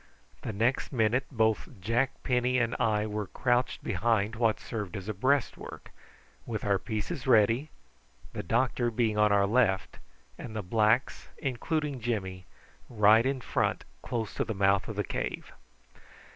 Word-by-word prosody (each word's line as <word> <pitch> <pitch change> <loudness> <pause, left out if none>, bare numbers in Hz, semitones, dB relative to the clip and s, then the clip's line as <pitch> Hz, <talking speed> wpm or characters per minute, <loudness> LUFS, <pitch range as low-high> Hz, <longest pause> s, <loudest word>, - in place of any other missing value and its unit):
The - - -4
next 115 +6 0
minute 125 +1 +1
both 110 -5 0
Jack 115 +7 -1
Penny 125 0 +1
and 120 -1 +1
I 110 -3 +1
were 105 -1 -3
crouched 125 +3 0
behind 110 +1 0
what 115 -2 +1
served 105 -4 -5
as 95 0 -8
a 110 - -2
breastwork, 130 +7 -1 0.5
with 110 -3 -4
our 100 -1 +2
pieces 120 - -4
ready, 115 +4 +4 0.6
the - - -3
doctor 120 +5 +1
being 110 -2 0
on 105 0 +4
our 100 -1 +4
left, 100 -3 +1 0.4
and 110 -2 -7
the 110 - -3
blacks, 110 +6 +1
including 140 +2 -2
Jimmy, 95 -5 -3 0.4
right 110 +1 +5
in 135 -1 -1
front, - - -1 0.2
close 115 -3 -3
to - - -1
the 110 - -4
mouth 100 0 +2
of - - -5
the - - 0
cave. - - -4
115 Hz, 150 wpm, -29 LUFS, 105-125 Hz, 0.6 s, right